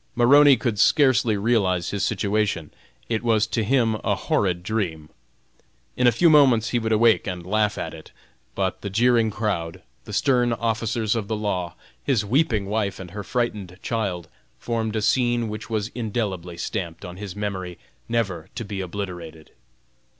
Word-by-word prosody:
Maroney 140 +3 +6
could 110 -2 -2
scarcely 120 -7 +4
realize 100 -6 +1
his 100 0 -2
situation; 100 -6 -1 0.4
it 110 -2 -1
was 110 -2 +2
to 110 0 -1
him 115 0 +2
a - - +1
horrid 90 -3 0
dream. 85 -7 -3 0.9
In 125 - +3
a - - +7
few 145 +10 +3
moments 135 -8 +5
he 120 - +1
would 110 -1 -2
awake 110 0 +4
and 90 -2 -5
laugh 105 +2 +1
at - - -4
it. - - -12 0.5
But 95 -1 -2
the 100 - -4
jeering 115 +2 +3
crowd, 100 -6 -3 0.2
the - - -9
stern 125 -3 +2
officers 115 -1 -1
of 110 -3 -2
the 110 - -1
law, 90 -5 -2 0.3
his 120 -7 +1
weeping 115 -3 +1
wife 100 0 -2
and 90 -2 -9
her 105 +2 -6
frightened 105 -6 -3
child, 95 -7 -2 0.3
formed 115 -2 -2
a 110 - -1
scene 120 0 +1
which 110 +2 -7
was 110 -1 -1
indelibly 100 -7 -3
stamped 85 -1 -4
on 90 0 -8
his 100 -1 -7
memory 95 -4 -4 0.3
never 95 -7 -2
to 115 - -4
be 100 -1 -4
obliterated. 85 -4 -7
105 Hz, 165 wpm, -23 LUFS, 95-115 Hz, 0.9 s, a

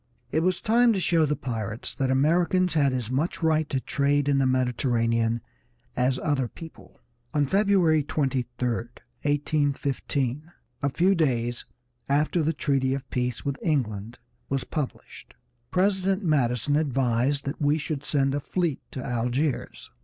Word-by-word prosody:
It 160 - +2
was 180 +2 +1
time 235 +1 +4
to 195 - 0
show 165 -3 +3
the 150 - 0
pirates 110 -4 -4
that 135 -1 -1
Americans 170 +6 +2
had 145 -4 +3
as 125 -3 -3
much 155 +6 -1
right 155 -1 +2
to 135 - 0
trade 145 +1 +1
in 140 -1 +3
the 135 - +3
Mediterranean 115 -2 +1 0.5
as 125 +1 +1
other 135 -3 0
people. 160 +6 -13 0.4
On 145 -1 +3
February 190 -2 +3
23, 135 -3 0 0.2
1815, 140 +3 -2 0.3
a 140 - +1
few 180 +8 +3
days 120 -8 0 0.4
after 150 +4 +2
the 155 +1 +1
treaty 135 -3 0
of 135 -1 -7
peace 125 -1 -2
with 140 -1 -2
England 115 - -1 0.3
was 135 -1 0
published, 150 -5 -6 0.3
President 190 +1 +1
Madison 140 - +1
advised 135 -1 +1
that 140 +3 -4
we 145 +1 +3
should 145 -2 -4
send 135 -2 +1
a 145 - 0
fleet 170 0 -1
to 130 - -6
Algiers. 125 +4 -2
140 Hz, 145 wpm, -26 LUFS, 125-160 Hz, 0.5 s, time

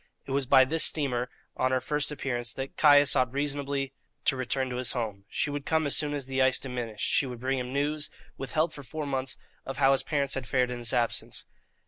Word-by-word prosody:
It - - -7
was 135 -1 0
by 130 +1 +7
this 160 +4 +2
steamer, 125 -5 +2 0.3
on 130 - +1
her 130 0 +2
first 145 +3 0
appearance, 120 -5 -2
that 135 0 -6
Caius 145 -2 +6
ought 130 -3 +2
reasonably 140 -1 -2 0.3
to - - +3
return 130 +1 -1
to 125 - -3
his 125 -1 0
home. 105 -5 -4
She 145 - -1
would 145 -1 -4
come 160 +1 +1
as 145 - +1
soon 145 -1 0
as 140 -2 -3
the 135 0 -1
ice 130 0 +4
diminished; 120 -5 -4
she 140 - +2
would 125 -2 -7
bring 130 +2 0
him 125 0 -4
news, 145 +2 0 0.3
withheld 155 +5 -1
for 145 - -8
four 150 +4 -5
months, 135 -1 -2 0.3
of 135 -1 -6
how 135 0 +5
his 135 - +3
parents 140 -3 -1
had 130 -3 -4
fared 125 +1 +1
in 120 - -4
his 120 -1 +1
absence. 120 -3 -1
135 Hz, 225 wpm, -28 LUFS, 125-145 Hz, 0.3 s, by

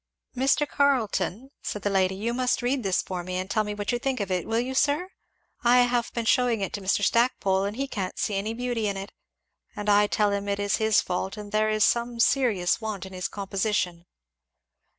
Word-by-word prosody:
"Mr. 270 +3 +2
Carleton," 255 -4 0
said 210 - -5
the 205 - +1
lady, 190 -1 +2
"you 225 +5 -2
must 250 0 0
read 255 +2 +1
this 195 -4 0
for 180 -2 -5
me 180 +1 -5
and 185 +1 -4
tell 215 - +2
me 210 0 -4
what 205 +2 -2
you 240 - -1
think 265 -1 -1
of 200 -2 -3
it, 180 -2 -1
will 225 +1 +1
you 255 +2 -2
sir? 295 +7 +1 0.5
I 245 +1 +6
have 245 -1 +1
been 235 -1 -2
shewing 245 -2 +2
it 195 - -3
to 205 - -4
Mr. 195 +1 +1
Stackpole 200 -5 +2
and 205 +3 -4
he 275 +1 -1
can't 195 -8 -4
see 210 - -1
any 205 +3 -2
beauty 240 -3 -1
in 200 -1 -2
it, 195 +1 -7 0.6
and 210 0 -3
I 205 0 +5
tell 210 0 +1
him 200 0 -2
it 200 0 -1
is 205 -1 +1
his 220 -1 +3
fault 190 +3 -3
and 205 -1 -8
there 215 +1 +2
is 215 0 +2
some 235 0 0
serious 230 -7 +2
want 215 -4 -4
in 190 - -10
his 185 -1 -2
composition. 195 -3 -2
210 Hz, 220 wpm, -26 LUFS, 195-245 Hz, 0.6 s, I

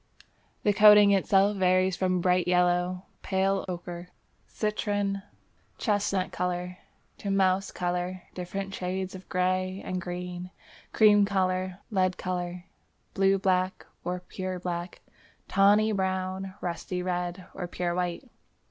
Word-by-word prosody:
The 205 - +3
coating 210 0 +8
itself 195 +1 +3
varies 185 0 +3
from 185 -1 0
"bright 180 0 +2
yellow, 180 0 +2 0.2
pale 195 0 0
ochre, 175 0 -6 0.4
citron, 205 -2 -1 0.6
chestnut 205 -3 0
colour, 180 0 -3 0.4
to 200 - -4
mouse 195 0 +2
colour, 180 0 -3
different 195 +2 -5
shades 185 0 -3
of 190 0 -11
grey 185 +1 0
and 185 0 -3
green, 180 0 -5 0.4
cream 210 -2 +6
colour, 185 -2 0
lead 185 -2 +1
colour, 180 -1 -4 0.5
blue 195 0 +3
black 185 -1 0 0.2
or 180 +1 -3
pure 185 0 -5
black, 175 0 -5 0.5
tawny, 205 +3 +4
brown, 190 -1 -2
rusty 180 +1 -3
red 180 0 -3
or 180 - -5
pure 175 0 -2
white." 180 +7 -2
185 Hz, 120 wpm, -28 LUFS, 180-195 Hz, 0.6 s, coating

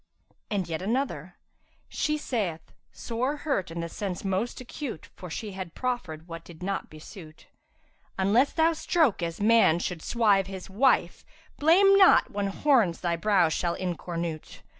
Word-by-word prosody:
And 200 -4 -1
yet 160 0 -4
another, 250 +8 -2 0.5
'She 305 0 -1
saith 195 - -3 0.2
(sore 250 +5 -3
hurt 275 - -2
in 170 0 -4
sense 185 +1 -5
the 195 - -2
most 195 +6 -2
acute 255 - -7
* - - -40
For 180 - -9
she 210 +6 -5
had 185 -3 -7
proffered 185 -11 -4
what 165 -1 -8
did 170 0 -12
not 195 +1 -3
besuit), 155 +1 -12 0.7
'Unless 210 +8 +3
thou 330 0 +3
stroke 315 - +1
as 165 -1 -3
man 220 -6 +5
should 175 -1 -3
swive 205 -4 +2
his 190 -1 -8
wife 220 -5 +2 0.2
* 320 - -30
Blame 380 +6 +6
not 380 - +6
when 205 -1 -2
horns 215 - +2
thy 170 -1 0
brow 190 -1 +3
shall 170 +2 -1
incornůte! 170 -3 -5
195 Hz, 160 wpm, -27 LUFS, 170-250 Hz, 0.7 s, Blame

